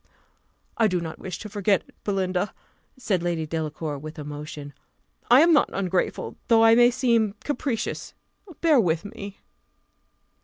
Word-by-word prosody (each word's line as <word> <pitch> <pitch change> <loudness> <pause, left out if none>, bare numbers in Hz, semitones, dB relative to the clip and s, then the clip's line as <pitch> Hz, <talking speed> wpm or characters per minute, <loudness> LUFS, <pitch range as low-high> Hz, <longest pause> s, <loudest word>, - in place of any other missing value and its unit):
"I 225 - +4
do 180 -3 0
not 165 -2 -6
wish 190 - -6
to 215 - -8
forget 205 -1 +1
it, - - -21
Belinda," 190 -1 -1 0.4
said 210 -8 0
Lady 170 -2 -1
Delacour, 155 -2 -4
with 155 +3 -9
emotion; 145 -1 -7 0.6
"I 250 +4 +8
am 335 +1 +5
not 295 - +4
ungrateful, 185 -2 -2
though 225 -2 +5
I 225 0 +7
may 240 +1 +6
seem 235 -5 +1
capricious 275 -6 -3 0.5
bear 315 -5 +5
with 170 -4 +1
me." 200 -1 -8
195 Hz, 145 wpm, -25 LUFS, 160-230 Hz, 0.6 s, I